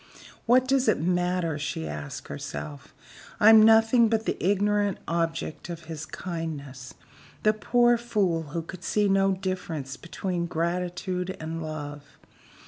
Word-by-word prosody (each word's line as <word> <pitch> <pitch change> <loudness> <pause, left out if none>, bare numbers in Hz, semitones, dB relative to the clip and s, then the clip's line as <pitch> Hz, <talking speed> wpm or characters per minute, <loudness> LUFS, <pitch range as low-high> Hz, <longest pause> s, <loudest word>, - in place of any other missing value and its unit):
"What 255 +2 +5
does 270 -1 +2
it 215 - +3
matter?" 175 -2 0
she 80 - -3
asked 75 -1 -6
herself. 75 0 -7 0.5
"I'm 220 +1 +8
nothing 225 +1 +6
but 220 0 0
the - - 0
ignorant 205 +1 +2
object 165 0 -2
of 170 -1 -6
his 155 -1 -7
kindness 145 -7 -6 0.5
the 215 - +4
poor 240 +2 +3
fool 205 -8 0
who 165 +3 -4
could 180 +2 -10
see 210 +1 +1
no 195 0 +3
difference 180 -8 -4
between 175 0 -3
gratitude 180 +2 -2
and 160 +1 -5
love. 145 -2 -7
180 Hz, 135 wpm, -26 LUFS, 160-205 Hz, 0.5 s, I'm